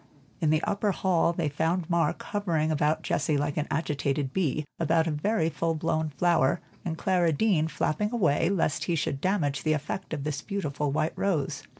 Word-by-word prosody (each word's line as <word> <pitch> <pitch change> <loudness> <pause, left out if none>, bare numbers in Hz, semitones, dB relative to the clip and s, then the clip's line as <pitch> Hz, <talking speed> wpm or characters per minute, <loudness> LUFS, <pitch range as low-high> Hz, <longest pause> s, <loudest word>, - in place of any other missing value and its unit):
In 160 - +1
the 155 +1 +2
upper 205 0 +1
hall 175 -3 +2
they 170 -2 -1
found 160 +4 0
Mark 170 -1 +1
hovering 170 -7 0
about 155 +1 +1
Jessie 150 -1 0
like 145 0 -1
an 150 -1 -1
agitated 145 -3 -1
bee, 155 -5 0
about 165 0 +2
a 165 - 0
very 160 +3 +1
full 165 0 -1
blown 160 0 0
flower, 165 0 +2 0.2
and 165 -2 -3
Clara 180 -3 +2
Deane 160 -1 +2
flapping 155 +5 -1
him 240 - -4
away, 170 -5 +2
lest 175 -6 0
he 170 - 0
should 140 -3 -2
damage 160 -8 0
the 155 - +2
effect 155 +5 -4
of 150 -3 -3
this 150 0 -3
beautiful 150 -8 -2
white 155 +2 0
rose. 170 -9 -1
160 Hz, 190 wpm, -27 LUFS, 150-175 Hz, 0.2 s, the